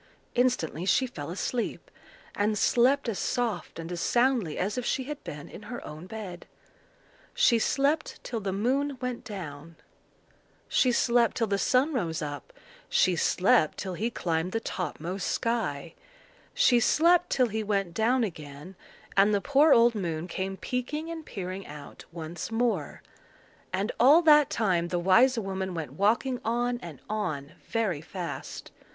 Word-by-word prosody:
Instantly 245 -10 +1
she 230 +7 +3
fell 150 - -7
asleep, 225 +6 -3 0.4
and 210 +1 0
slept 255 +6 +3
as 225 -4 -2
soft 225 -12 -2
and 165 +1 -6
as 175 -1 -3
soundly 240 - +1
as 200 +3 -1
if 250 - -2
she 260 - -1
had 295 +2 -7
been 145 0 -8
in - - -11
her 240 - -6
own 155 +4 -9
bed. 190 -4 -8 0.9
She 275 - +4
slept 285 +6 0
till 235 - -3
the 195 -2 -3
moon 260 +8 0
went 250 -1 -4
down; 165 -7 -8 0.9
she 255 - +3
slept 235 0 +2
till 230 - +2
the 200 -2 -1
sun 265 +9 +2
rose 170 - -1
up; 145 - -6 0.4
she 185 - +3
slept 180 +1 +3
till 190 -2 -4
he 220 +6 -1
climbed 175 -5 -2
the 225 - +1
topmost 180 -2 -4
sky; 170 -10 -2 0.6
she 265 - +5
slept 335 +8 +4
till 255 -3 +2
he 220 +1 -2
went 200 -4 -1
down 235 +5 +2
again, 155 -2 -7 0.4
and 200 +2 +5
the - - +2
poor 285 +7 +4
old 235 -1 +6
moon 170 -5 -3
came 190 +2 -4
peaking 295 +9 -3
and 325 -2 -7
peering 190 -1 -6
out 145 -1 -11
once 165 +3 -6
more: 225 -9 -1 0.7
and 195 +4 -1
all 290 +8 +7
that 300 -3 +6
time 185 -6 +1
the 175 - -1
wise 230 +9 +4
woman 190 -3 -3
went 155 -6 -5
walking 230 - +1
on 240 +2 0
and 165 -6 -9
on 165 -10 -3 0.2
very 210 -10 0
fast. 175 +1 -7
210 Hz, 155 wpm, -28 LUFS, 175-245 Hz, 0.9 s, all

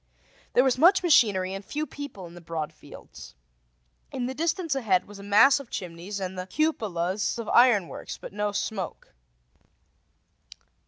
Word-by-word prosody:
There 250 - +5
was 255 -1 +1
much 370 +5 +5
machinery 205 - +3
and 195 +1 -6
a - - -29
few 300 +1 -3
people 285 -12 -8
in 170 - -12
the 175 - -12
broad 160 -2 -5
fields. - - -13 0.8
In 255 -2 -3
the 260 - -3
distance 330 +2 -1
ahead 220 -9 +1
was 205 0 -12
a - - -9
mass 220 +8 +5
of 275 -4 -11
chimneys 180 +3 -6
and 190 -1 -4
the 180 - -5
cupolas 200 - -1
of 230 -2 -5
iron 235 -7 +5
works, - - -8
but - - -10
no 210 0 -1
smoke. 200 - -5
210 Hz, 165 wpm, -26 LUFS, 185-270 Hz, 0.8 s, There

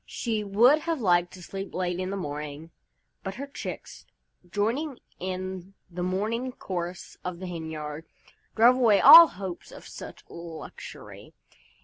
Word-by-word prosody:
She 220 -3 -2
would 235 +9 +5
have 330 -1 -2
liked 175 -5 +2
to 185 - -11
sleep 195 +2 -7
late 180 -1 -2
in 185 0 -3
the 200 - -3
morning, 150 -1 -6 0.5
but 190 0 -5
her 275 - -5
chicks, 280 - -8 0.4
joining 240 - -1 0.2
in 185 +1 -5 0.2
the 175 +1 -5
morning 215 +8 -2
chorus 175 -3 -6
of 180 -1 -4
the 185 - -7
hen 165 -3 -6
yard, 155 0 -6 0.5
drove 240 +3 +6
away 225 -6 +5
all 335 0 +11
hopes 185 - -8
of - - -12
such - - -10
a - - -15
luxury. 170 - -10
185 Hz, 150 wpm, -27 LUFS, 175-230 Hz, 0.5 s, all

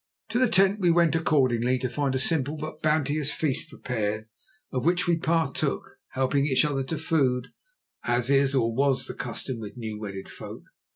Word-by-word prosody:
To 230 +2 0
the 255 -2 +4
tent 195 -1 +4
we 180 -3 +3
went 170 -1 +4
accordingly, 130 -6 +2
to 130 0 -2
find 135 +1 -1
a - - +2
simple 145 +1 0
but 155 +1 -7
bounteous 150 -1 +1
feast 145 -5 -1
prepared, 110 -3 -3 0.5
of 130 - -2
which 175 +2 +2
we 175 - +3
partook, 165 -3 0 0.3
helping 135 +2 +1
each 130 0 +3
other 140 -2 -1
to 155 +4 -3
food, 135 -6 +1 0.5
as 120 +2 +1
is, 140 0 +3
or 115 -3 +2
was, 135 +1 +1
the - - -6
custom 125 0 -4
with 105 +1 -8
new 110 -3 -5
wedded 100 -2 -6
folk. - - -9
135 Hz, 180 wpm, -26 LUFS, 125-160 Hz, 0.5 s, the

